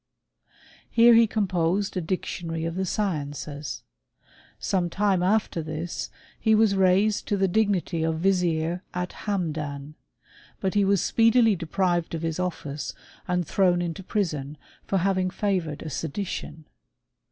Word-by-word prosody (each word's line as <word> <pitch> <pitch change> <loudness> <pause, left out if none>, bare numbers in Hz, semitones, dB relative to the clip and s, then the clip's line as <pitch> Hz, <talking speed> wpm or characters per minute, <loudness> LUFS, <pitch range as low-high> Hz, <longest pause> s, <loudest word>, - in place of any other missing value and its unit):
Here 235 +1 +6
he 230 0 +6
com* 210 -1 0
posed 185 +3 0
a 185 - 0
dictionary 165 -1 -3
of 165 - -2
the 190 +1 -2
sciences. 145 -7 -3 0.7
Sometime 190 +1 +1
aftef 185 -2 +1
this 155 +2 -4 0.3
he 220 0 +4
was 215 -2 +4
raised 195 +3 +3
to 205 - +1
the 195 0 +2
dignity 190 -4 +1
of 160 0 0
vizier 175 -2 +1
at 180 0 -3
Hamdan 150 -7 -2
j 155 - -22 0.6
but 190 -1 -1
he 205 -1 +3
was 195 -1 +3
speedily 230 -1 +4
deprived 175 0 0
of 165 - -5
his 165 +1 -2
office 155 -5 -4 0.3
and 180 -1 0
thrown 180 +1 +2
into 175 +1 -3
prison 155 -8 -2 0.3
for 195 - +1
having 185 0 +1
favoured 180 -6 -2
a 160 - -5
sedition. 160 0 -4
180 Hz, 140 wpm, -26 LUFS, 160-200 Hz, 0.7 s, Here